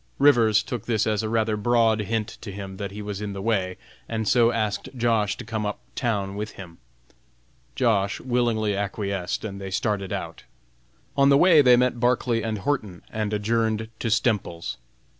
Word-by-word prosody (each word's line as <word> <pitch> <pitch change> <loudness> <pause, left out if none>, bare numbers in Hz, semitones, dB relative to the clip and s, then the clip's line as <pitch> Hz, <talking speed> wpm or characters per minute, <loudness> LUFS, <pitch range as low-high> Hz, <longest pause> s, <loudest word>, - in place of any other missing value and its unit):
Rivers 115 -7 +5
took 125 -5 -5
this 110 -3 +1
as 110 -1 +1
a 110 - -3
rather 110 -1 +1
broad 115 0 +2
hint 110 +1 -3
to 105 - -7
him 95 -1 -7
that 100 -1 -4
he 105 +2 -7
was 105 -1 -5
in 105 -1 -4
the 100 - -6
way, 95 -5 0 0.3
and 110 -2 -2
so 120 -1 +4
asked 110 -3 -2
Josh. 115 -4 +1
to 125 - -8
come 110 -1 -3
up 105 0 -2 0.2
town 100 -6 -1
with 105 +1 -5
him. 85 -4 -11 1.0
Josh. 105 -4 +1
willingly 120 -4 0
acquiesced, 100 -1 -3
and 100 -2 -6
they 95 - -5
started 100 -1 -1
out. - - -5 0.7
On 140 0 +5
the 140 - +6
way 170 -1 +7
they 125 -3 +6
met 125 -1 +1
Barclay 120 -1 +1
and 110 -1 -2
Horton, 105 -7 -2
and 110 -1 -2
adjourned 110 +1 0
to 115 - -1
Stemples's. 105 -7 0
110 Hz, 180 wpm, -25 LUFS, 100-115 Hz, 1.0 s, way